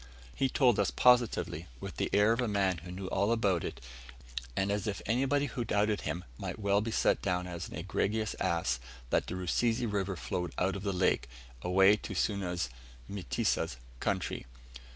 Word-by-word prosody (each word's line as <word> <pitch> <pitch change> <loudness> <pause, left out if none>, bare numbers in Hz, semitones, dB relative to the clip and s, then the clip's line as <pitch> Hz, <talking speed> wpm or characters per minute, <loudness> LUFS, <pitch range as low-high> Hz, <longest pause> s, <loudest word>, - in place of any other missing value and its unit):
He 135 +8 +1
told 125 -5 +4
us 100 - +3
positively, 120 -9 +3
with - - -7
the - - 0
air 105 +3 +5
of 115 - 0
a 120 - +1
man 95 -4 +1
who 85 +4 -10
knew 95 +1 -6
all 100 +3 +1
about 100 -7 +2
it, - - -5 0.8
and 95 +1 +1
as 105 +1 -1
if 100 -3 -2
anybody 135 +5 +2
who 130 -3 -3
doubted 105 -1 +1
him 80 +4 -3 0.2
might - - -4
well 100 -1 +2
be 115 - -2
set - - +2
down 90 -1 0
as 85 -1 -5
an - - -8
egregious 110 0 -1
ass, 65 -8 +1 0.3
that - - +2
the 90 - -3
Rusizi 115 +6 +1
River 100 -3 -1
flowed 90 +1 -3
out 95 +1 +1
of 100 - -4
the 100 0 -1
lake, 90 -9 +1 0.3
away 95 +4 +5
to 105 - -6
Suna's 90 -6 0 0.4
(Mtesa's) 90 -9 -1 0.2
country. - - -2
100 Hz, 180 wpm, -32 LUFS, 90-110 Hz, 0.8 s, air